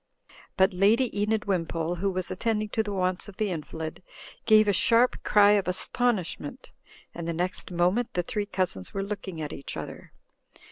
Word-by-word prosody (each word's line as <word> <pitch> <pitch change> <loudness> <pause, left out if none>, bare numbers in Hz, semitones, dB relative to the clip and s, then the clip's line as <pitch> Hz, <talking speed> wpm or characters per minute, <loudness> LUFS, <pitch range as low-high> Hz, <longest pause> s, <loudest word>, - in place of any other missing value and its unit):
But 190 0 +4
Lady 215 +7 +3
Enid 215 0 0
Wimpole, 170 -3 -1
who 195 +3 0
was 185 -1 -3
attending 215 +2 -1
to 220 - 0
the 210 -1 -4
wants 185 0 -1
of 195 - -13
the 210 -3 0
invalid, 160 0 -5 0.5
gave 215 -1 +6
a 205 - +3
sharp 235 +6 +3
cry 205 -1 +5
of 200 -3 +2
astonishment; 185 -4 -2 0.4
and 170 -1 -6
the 170 - -1
next 180 +3 -3
moment 180 +7 +1
the 175 - +1
three 205 +3 -3
cousins 185 - -3
were 195 - -1
looking 195 -4 -5
at 150 - -5
each 140 - -6
other. - - -8
190 Hz, 175 wpm, -27 LUFS, 175-210 Hz, 0.5 s, gave